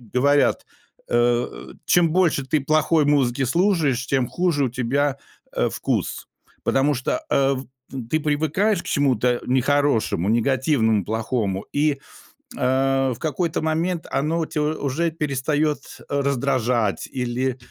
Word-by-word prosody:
говорят, 140 +3 +3 0.4
э: 120 0 0
чем 175 -2 +4
больше 170 -5 +2
ты 150 +2 0
плохой 155 0 +3
музыки 135 -3 +2
слушаешь, 155 - +1
тем 130 -3 +1
хуже 175 -3 0
у - - -1
тебя, 135 +3 0 0.4
э, - - +1
вкус, - - -3 0.4
потому 140 +2 +2
что, 130 - -2 0.2
э, 135 0 +3
в 130 +1 -6 0.3
в 125 -4 -7
ты 155 - +1
привыкаешь 160 +7 +1
к - - -21
чему-то, 130 -5 +1
э, 125 -1 +1
нехорошему, 130 - +1
негативному, 115 - +2
плохому, 110 -3 -2
и, 145 -1 +1 0.6
э, 135 +1 +1
в - - -10
какой-то 160 +2 -1
момент 165 +2 -1
оно 155 +4 0
у 165 - 0
тя 155 -1 -3
уже 155 +2 -1
перестает, 150 0 0 0.3
э, 140 0 0
раздражать, 125 -5 0
или, 125 0 -1
140 Hz, 135 wpm, -22 LUFS, 125-155 Hz, 0.6 s, чем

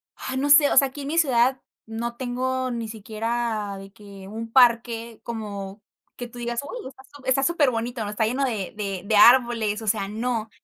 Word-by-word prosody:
ah, 260 - -6
no 285 +2 0
sé, 290 0 +7
o - - +1
sea, 275 - +6
aquí 285 +2 -9
en 275 - -6
mi 330 - -2
ciudad 260 -4 +3 0.2
no 230 +2 -5
tengo 255 +1 -2
ni 230 -2 -4
siquiera 220 -1 -3
de 195 0 -12
que 200 -3 -12
un 225 +2 -7
parque 235 -2 +3
como 205 -3 -6 0.4
que 245 - -6
tú 240 +1 -14
digas: 240 0 -3
"Uy, 470 - -7
está 265 0 -17
su 290 -1 -15
está 260 +1 +2
superbonito, 245 -8 0
¿no? 205 - -4
está 210 +1 0
lleno 255 +5 -1
de 215 -7 -3
de 195 -3 -4
de 215 - +1
árboles", 230 -2 +5
o 220 - -8
sea, 200 -2 0
no. 225 +1 -3
235 Hz, 205 wpm, -24 LUFS, 215-260 Hz, 0.4 s, sé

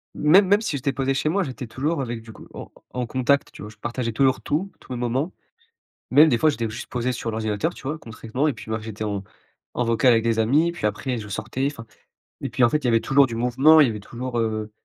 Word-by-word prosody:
Même 185 +6 +5
même 205 +2 +4
si 155 - -2
j'étais 135 +1 -1
posé 135 0 0
chez 150 +3 0
moi, 195 +3 +1
j'étais 130 -2 -6
toujours 145 +6 -2
avec 120 -3 -4
du 110 - -11
coup - - -14
en - - -9 0.2
en 125 -1 -2
contact, 130 +3 +1
tu - - -12
vois? 105 - -7
Je 105 - -16
partageais 120 0 -3
toujours 130 +3 +2
tout, 190 +7 -2
tous - - -15
mes - - -4
moments. 130 +8 -1 0.8
Même 155 +2 +7
des 120 - +2
fois, 155 +3 +3
j'étais 115 -2 -3
juste 120 +4 -7
posé 125 +1 -2
sur 115 -2 -4
l'ordinateur, 110 +8 -1
tu - - -14
vois? 155 +2 -2
Concrètement 115 +4 -3
et 145 - +1
puis, - - -11
bah, 110 - -1
j'étais 110 0 -6
en 100 -2 -3 0.5
en 120 - 0
vocal 115 +2 +3
avec 115 -1 +3
des 115 -1 +1
amis, 150 +10 +3
puis 170 - -5
après 120 +4 -1
je 105 -2 -7
sortais 130 +6 -3
enfin 115 -5 -11 0.6
et - - -3
puis 125 - -1
en 120 - +7
fait 150 - +1
il 150 - -15
y - - +2
avait 115 -1 +3
toujours 140 0 +4
du 115 -2 -6
mouvement, 130 +7 +5
il 145 - +7
y - - 0
avait 105 -1 -5
toujours, 120 +3 -5
heu, 110 -1 -1
125 Hz, 265 wpm, -23 LUFS, 115-140 Hz, 0.8 s, Même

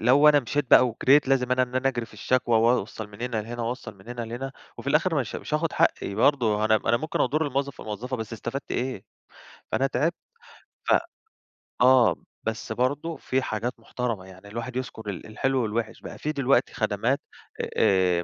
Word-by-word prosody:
لو 135 +6 +6
أنا 145 -1 +6
مشيت 135 +2 -2
بَقى 125 - +8
وجريت، 135 +4 +4
لازم 125 -2 +2
أنا 130 0 +3
إن 125 0 -4
أنا 130 +1 +2
أجري 120 -3 -2
في - - -17
الشكوى، 120 -3 +2
وأوصل 110 -2 +1
من 105 +3 -11
هنا 125 -2 -2
لهنا، 120 +2 -5
وأوصل 120 -2 -4
من 95 - -16
هنا 120 0 -5
لهنا، 120 +4 -5 0.3
وفي - - -9
الآخر 160 +4 +3
مش 115 - -5
مش 150 - -4
هاخد 160 +1 0
حقي 100 - +1
برضه، 110 -3 +3
أنا 110 0 +4
أنا 120 - +1
ممكن 155 +6 -3
أضُرّ 155 +1 +2
الموظف 140 0 -2
أو - - -9
الموظفة، 115 +5 -4
بس 110 -1 -6
إستفدت 120 +4 -5
إيه؟ 125 -5 -2 0.7
فأنا 135 - +2
تعبت، 145 +5 0 0.7
ف - - +5 0.9
آه، 130 -1 +6 0.3
بس 110 0 -4
برضه 140 +8 -1
في 130 +1 -1
حاجات 120 0 -2
محترمة، 115 -4 -3
يعني 95 +1 -14
الواحد 115 +4 -6
يذكر 110 -4 -5
ال 90 -5 -6
الحلو 130 +4 0
والوحش. 110 +1 -3
بَقى - - -8
في 150 - -2
دلوقتي 140 -2 +2
خدمات - - 0 0.6
آآ 90 -3 +3
125 Hz, 190 wpm, -26 LUFS, 110-135 Hz, 0.9 s, بَقى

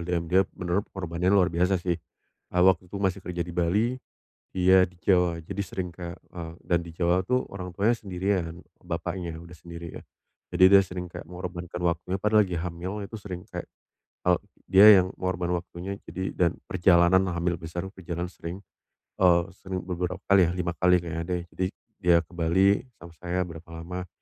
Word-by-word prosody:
LDM 85 -1 -1
dia 90 +3 +4 0.2
menurut 90 +3 0
pengorbannya 90 -1 -1
luar 95 -2 +5
biasa 90 +2 +2
sih, 90 0 -1 0.6
eee, 90 0 +2
waktu 95 -1 +3
itu - - -5
masih 95 -1 0
kerja 90 -1 -3
di 90 - -7
Bali, 90 +6 +2 0.7
dia 95 0 +5
di 90 - -18
Jawa. 90 -3 +2
Jadi 100 +5 -5
sering 95 -2 -4
kayak 85 0 -8
eee, 85 -2 -8
dan 85 - +1
Jawa 85 +2 +1
itu 125 +2 +2
orang 90 -2 -7
tuanya 105 +6 +3
sendirian, 90 -3 -2 0.2
bapaknya 85 0 -4
udah 85 0 -12
sendiri 85 0 -9
ya. - - -12 0.5
Jadi, 95 0 +7
dia 100 0 +8
sering 90 -1 -6
kayak - - -8
mengorbankan 90 0 -6
waktunya, 90 +1 -1
padahal 105 0 +4
lagi 90 - -4
hamil 90 +4 -4
itu 110 +3 -7
sering 95 -4 -7
kayak, 90 -1 -5 0.6
eee, 90 -1 +4 0.3
dia 95 +2 +9 0.2
yang 95 - -5
ngorban 90 -1 -1
waktunya. 90 +2 -5
Jadi 95 +4 -3
dan 85 -2 +1
perjalanan 85 +1 +4
hamil 85 -1 -1
besar, 85 +3 -5
perjalanan 90 -2 -5
sering, 90 +4 -7 0.6
eee, 85 -2 +6
sering 95 0 -5
beberapa 90 0 -3
kali 95 -3 +5
ya, - - -1
5 90 -1 -1
kali 90 +1 +4
kayaknya 85 -1 -4
deh. 90 -1 -1
Jadi, 95 - 0 0.3
dia 85 -3 +4
ke 80 - -26
Bali 90 +4 +3 0.2
sama 85 0 -13
saya 90 +1 -1
berapa 85 -1 -10
lama, 90 +2 -6
90 Hz, 180 wpm, -27 LUFS, 85-95 Hz, 0.7 s, dia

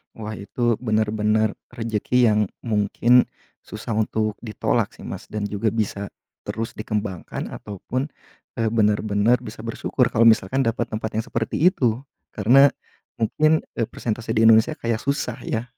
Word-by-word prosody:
Wah 110 -1 -6
itu 120 +3 -1
benar-benar 110 -1 +1 0.2
rezeki 115 0 -1
yang 105 -1 +3 0.2
mungkin 115 +3 +3 0.4
susah 105 +2 -7
untuk 110 -1 0
ditolak 110 -3 0
sih - - -13
Mas, - - -7
dan 105 -1 -3
juga 105 +2 0
bisa 100 -2 -2 0.4
terus 115 +2 -4
dikembangkan 105 -4 -4
ataupun 125 +7 -4 0.5
e 115 - -2
benar-benar 105 +1 +2
bisa 110 -1 -8
bersyukur 115 - 0
kalau 115 - +4
misalkan 115 +3 +4
dapat 115 -1 -1
tempat 110 0 -3
yang 110 - -3
seperti 115 -1 -2
itu. 120 -6 0 0.3
Karena, 130 +7 +6 0.5
mungkin 155 +8 +2
e 115 - 0
persentase 115 0 -4
di 110 - +3
Indonesia 110 0 +5
kayak 115 -1 -1
susah 140 -4 -2
ya, 115 - -2
110 Hz, 140 wpm, -23 LUFS, 105-115 Hz, 0.5 s, Karena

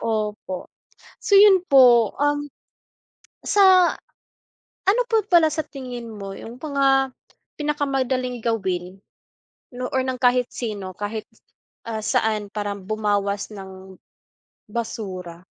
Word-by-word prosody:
opo. 210 -4 -3 0.5
So, 400 -3 +4
'yun 390 -3 +6
po, 245 - +6
um, 290 0 0 0.9
sa 375 -3 +5 0.9
ano 420 +6 +4
po 445 -3 +2
pala 340 -5 +5
sa 310 +1 -3
tingin 250 -3 -8
mo 195 -2 -7
'yung 235 +3 -10
mga 275 -3 +2 0.5
pinakamadaling 270 -4 -1
gawin 190 -5 -3 0.7
nu 250 +1 -4
or 260 - +2
ng 260 -1 -3
kahit 250 0 +4
sino, 205 -5 -5
kahit, 210 +2 -5 0.6
ah, 225 -1 -3
saan, 215 -2 0
parang 205 -2 -4
bumawas 205 0 -1
ng 190 -1 -11 0.8
basura? 190 -6 -5
235 Hz, 110 wpm, -22 LUFS, 205-280 Hz, 0.9 s, yun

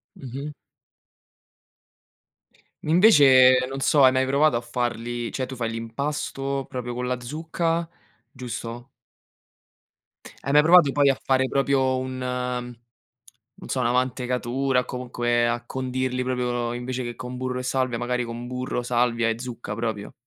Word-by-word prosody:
Mh-mh. 140 +3 -7 2.3
Invece, 135 - +6
non 135 +1 -5
so, 140 +1 +4
hai 130 - +7
mai 130 0 +1
provato 140 -1 +3
a 120 - 0
farli 120 0 -3
cioè, 130 -1 -3
tu 130 - -7
fai 115 -2 -2
l'impasto 135 +3 -3
proprio 125 -2 -5
con 125 +1 -3
la 125 0 -2
zucca, 165 +5 -2 0.4
giusto? 120 -1 -7 1.5
Hai 140 - -3
mai 150 +1 +7
provato 170 -4 +6
poi 140 -1 +3
a 135 - +1
fare 130 0 +2
proprio 135 -1 +1
un 130 0 -4 1.4
non - - -11
so, 130 - -1
una 120 -1 +1
mantecatura, 125 0 0
comunque 120 -1 -1
a 120 0 -2
condirli 130 0 -2
proprio, 120 -2 -1
invece 125 +1 -4
che 120 0 -5
con 125 0 -7
burro 130 0 -3
e - - -5
salvia, 130 -1 -1
magari 125 0 -1
con 120 +1 -6
burro, 125 -1 -3
salvia 120 -1 +1
e 115 +1 -2
zucca 120 -4 -6
proprio? 110 -2 -4
125 Hz, 140 wpm, -24 LUFS, 120-135 Hz, 2.3 s, hai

